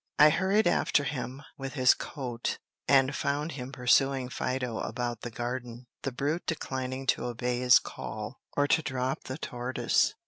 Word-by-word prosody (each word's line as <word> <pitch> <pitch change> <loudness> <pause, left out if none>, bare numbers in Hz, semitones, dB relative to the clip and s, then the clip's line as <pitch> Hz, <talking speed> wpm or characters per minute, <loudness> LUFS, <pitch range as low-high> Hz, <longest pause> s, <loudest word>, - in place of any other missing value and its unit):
I 150 +1 +8
hurried 190 +6 +2
after 165 -4 +3
him 130 0 -4 0.2
with 135 -1 -5
his 130 -2 +6
coat, 125 -5 -4 0.3
and 135 0 +4
found 145 +3 -1
him 130 -2 -6
pursuing 130 0 +3
Fido 125 -3 -2
about 120 -1 -3
the 120 - -4
garden, 120 +1 -5 0.2
the 135 - -2
brute 145 +7 -2
declining 130 -4 -3
to - - +1
obey 125 0 -1
his 125 -1 +7
call, - - -6 0.2
or 145 0 +4
to 160 - +4
drop 130 -2 -2
the 130 - -5
tortoise. 125 -3 0
130 Hz, 160 wpm, -29 LUFS, 125-140 Hz, 0.3 s, I